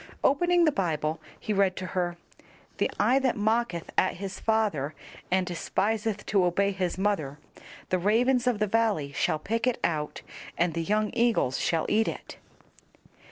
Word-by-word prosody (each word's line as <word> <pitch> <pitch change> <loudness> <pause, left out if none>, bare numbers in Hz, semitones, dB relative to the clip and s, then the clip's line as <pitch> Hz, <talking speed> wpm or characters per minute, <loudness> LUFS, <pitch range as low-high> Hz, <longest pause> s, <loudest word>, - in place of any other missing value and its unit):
Opening 350 +5 +4
the 310 - +4
Bible, 160 - -1 0.2
he 215 - -2
read 195 -2 +2
to 185 - -5
her, 175 -2 -2 0.6
"The - - +2
eye 265 - +4
that 260 -3 0
mocketh 215 -4 0
at 185 - +1
his 195 +1 -6
father 200 -11 0 0.3
and 185 0 +2
despiseth 210 +4 -1
to 195 -3 +2
obey 195 +3 +2
his 185 -2 -2
mother, 190 -8 -1 0.5
the 185 - +1
ravens 245 +6 +2
of 245 -3 +2
the 210 - +1
valley 210 -9 +1
shall 155 - 0
pick 225 +9 -2
it 250 - +1
out, 150 -3 -2 0.3
and 175 -1 +1
the 165 - -1
young 210 +4 0
eagles 230 - +1
shall 165 -2 0
eat 220 +1 +2
it." - - -6
200 Hz, 160 wpm, -27 LUFS, 175-225 Hz, 0.6 s, Opening